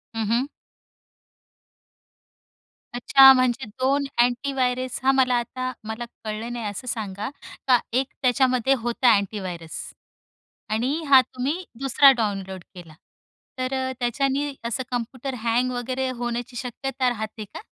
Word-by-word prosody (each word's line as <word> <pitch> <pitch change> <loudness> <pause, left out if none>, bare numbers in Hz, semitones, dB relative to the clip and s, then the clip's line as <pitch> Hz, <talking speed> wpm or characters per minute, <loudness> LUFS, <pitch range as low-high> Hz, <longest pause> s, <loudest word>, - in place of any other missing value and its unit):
हं, 225 - -1
हं. 245 +3 +2 2.5
अच्छा, 270 +2 +8
म्हणजे 255 0 +1
2 265 +6 0 0.2
अँटीव्हायरस 255 0 -1
हां, 270 - +4
मला 255 -2 +3
आता 255 +1 -4
मला 220 +2 -5 0.2
कळलं 220 +2 -4
नाही. 235 -2 -5
असं 205 +5 -6
सांगा, 210 -2 -4 0.4
का 250 -2 +6
1 260 +1 +1
त्याच्यामध्ये 255 0 +3
होता 240 0 +3
अँटीव्हायरस. 185 -5 -4 0.9
आणि 235 +5 0 0.2
हा 265 -2 +9
तुम्ही 265 +8 -3 0.2
दुसरा 275 +1 +6
डाउनलोड 195 -4 -3
केला, 170 -3 -11 0.7
तर 255 +1 -2
अ, 260 0 -1
त्याच्यानी 275 +4 0
असं 235 +3 -2
कॉम्प्युटर 250 +2 -4
हँग 245 +2 +1
वगैरे 255 +2 -2
होण्याची 240 0 -4
शक्यता 255 +1 -2
राहते 220 -2 -5
का? - - -8
245 Hz, 120 wpm, -24 LUFS, 225-260 Hz, 2.5 s, हा